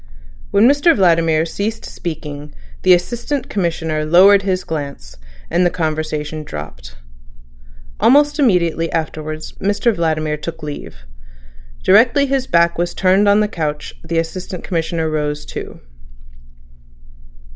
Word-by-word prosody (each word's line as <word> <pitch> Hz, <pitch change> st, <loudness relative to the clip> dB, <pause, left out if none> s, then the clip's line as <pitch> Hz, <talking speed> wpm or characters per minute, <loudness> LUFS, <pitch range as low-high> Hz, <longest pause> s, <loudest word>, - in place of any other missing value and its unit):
When 210 Hz, +4 st, +4 dB
Mr 285 Hz, +5 st, +4 dB
Vladimir 165 Hz, -4 st, +3 dB
ceased 215 Hz, +6 st, -4 dB
speaking 150 Hz, -3 st, -7 dB, 0.3 s
the 180 Hz, -, +6 dB
Assistant 240 Hz, +9 st, -4 dB
Commissioner 160 Hz, -5 st, -1 dB
lowered 190 Hz, +6 st, +6 dB
his 185 Hz, -2 st, -1 dB
glance, 140 Hz, -, -6 dB, 0.3 s
and 175 Hz, +2 st, +1 dB
the 175 Hz, -, +3 dB
conversation 155 Hz, -2 st, -3 dB
dropped. 75 Hz, -, -9 dB, 1.0 s
Almost 290 Hz, +3 st, +4 dB
immediately 170 Hz, -, +2 dB
afterwards 155 Hz, -1 st, -4 dB
Mr 205 Hz, +4 st, +1 dB
Vladimir 155 Hz, -3 st, -1 dB
took 160 Hz, +1 st, -7 dB
leave. 100 Hz, -, -8 dB, 0.8 s
Directly 235 Hz, +8 st, +5 dB
his 270 Hz, -1 st, -1 dB
back 170 Hz, 0 st, +2 dB
was 175 Hz, 0 st, -1 dB
turned 190 Hz, +2 st, +3 dB
on 205 Hz, +1 st, +4 dB
the 210 Hz, -, +1 dB
couch 150 Hz, -6 st, -4 dB
the 165 Hz, 0 st, -3 dB
Assistant 175 Hz, +2 st, -4 dB
Commissioner 165 Hz, -2 st, -2 dB
rose 150 Hz, -1 st, -2 dB
too. -, -, -8 dB
170 Hz, 120 wpm, -18 LUFS, 155-200 Hz, 1.0 s, the